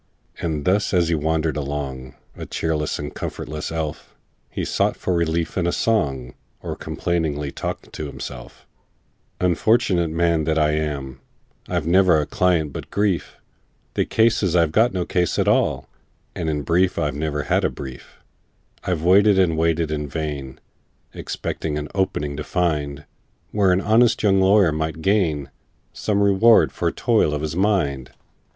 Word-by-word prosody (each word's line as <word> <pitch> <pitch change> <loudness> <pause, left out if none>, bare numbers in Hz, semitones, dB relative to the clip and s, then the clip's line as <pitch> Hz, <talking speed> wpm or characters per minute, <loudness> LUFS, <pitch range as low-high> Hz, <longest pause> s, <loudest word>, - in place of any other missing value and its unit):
And 80 -4 -3
thus 100 +1 +2
as 85 -2 +3
he - - +2
wandered 80 0 0
along, 70 -3 -5 0.2
A - - -8
cheerless 75 -2 -2
and 75 0 -6
comfortless 75 +1 -5
elf, 80 -2 -5 0.3
He - - -4
sought - - 0
for 90 - -1
relief 85 +1 0
in 85 - 0
a - - +1
song, 70 - 0 0.3
Or - - -5
complainingly 75 -5 -2
talked - - -6
to 75 - -5
himself:— 65 -3 -9 0.7
"Unfortunate 90 -1 +2
man 85 -1 +1
that 80 0 0
I 75 -1 +3
am! 70 -4 -3 0.5
I've 85 -4 -2
never 90 -1 +4
a 75 - -1
client 85 -4 +1
but - - -7
grief: 100 -4 -1 0.6
The - - +1
case 115 0 +2
is, 90 -4 +1
I've 85 -3 +2 0.2
no 90 -2 -2
case 90 -2 0
at - - +1
all, - - +1 0.5
And 80 -2 -3
in 75 -2 -2
brief, 90 +6 +2
I've 75 -3 0
ne'er 75 0 -2
had - - +1
a - - +2
brief! 65 -3 -10 0.6
"I've 85 -4 -2
waited 100 +3 +5
and 90 -4 +3
waited 80 0 +1
in 75 -1 -2
vain, 70 -4 -5 0.5
Expecting 75 -2 -4
an 75 0 -4
'opening' 75 -7 -1
to 75 - -4
find, 75 -5 -1 0.5
Where 100 -3 +3
an 90 +1 +2
honest 110 +3 +3
young 95 -2 +4
lawyer 95 -2 +5
might 80 +1 -3
gain 80 -9 +1 0.4
Some 100 -1 0
reward 100 +4 +5
for - - -1
toil 75 - +1
of 75 - -4
his 80 +1 -3
mind. 85 -10 0
80 Hz, 160 wpm, -22 LUFS, 75-90 Hz, 0.7 s, waited